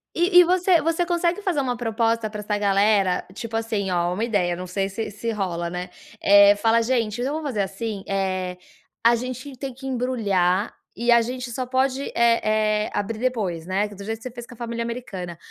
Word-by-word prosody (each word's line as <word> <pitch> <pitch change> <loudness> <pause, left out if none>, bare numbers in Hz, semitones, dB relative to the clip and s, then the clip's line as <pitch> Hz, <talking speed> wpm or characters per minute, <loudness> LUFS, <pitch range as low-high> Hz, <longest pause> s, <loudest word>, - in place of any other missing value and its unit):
E 355 +1 +5
e - - +9
você 360 0 +3
você 330 +2 +1
consegue 345 +2 0
fazer 370 -7 0
uma 250 -3 -1
proposta 230 -1 0
pra 210 0 -7
essa 210 0 -2
galera, 200 -2 +2
tipo 225 +3 -6
assim, 220 -4 -1
ó, 175 0 +1
uma 205 +5 -2
ideia, 195 -7 +1
não 180 +1 -6
sei 195 +2 -2
se 210 +2 -4
se 230 +3 -3
rola, 175 -5 -2
né. 180 +1 -5 0.3
Eh, 200 0 +7
fala: 225 +2 +3
"Gente, 230 -2 0
então, 270 +4 -1
vamos 310 -1 -3
fazer, 215 -6 -1
assim, 200 +1 -4
eh, 185 -2 -2 0.5
a 235 +1 +6
gente 255 +3 -6
tem 270 +1 -5
que 265 +2 -12
embrulhar, 215 -7 0 0.2
e 240 +1 +1
a 235 0 +7
gente 250 +2 -4
só 255 +2 -3
pode, 260 +2 0
eh, 235 0 +3
eh, 215 0 +1
abrir 210 +2 -2
depois", 210 -10 -1
né, 195 +3 0
do 200 -1 -10
jeito 220 +2 -3
que 225 - -18
você 255 - -6
fez 240 0 -9
com 250 - -12
a - - -22
família 235 0 -3
americana. 195 -8 -6
225 Hz, 210 wpm, -23 LUFS, 200-250 Hz, 0.5 s, e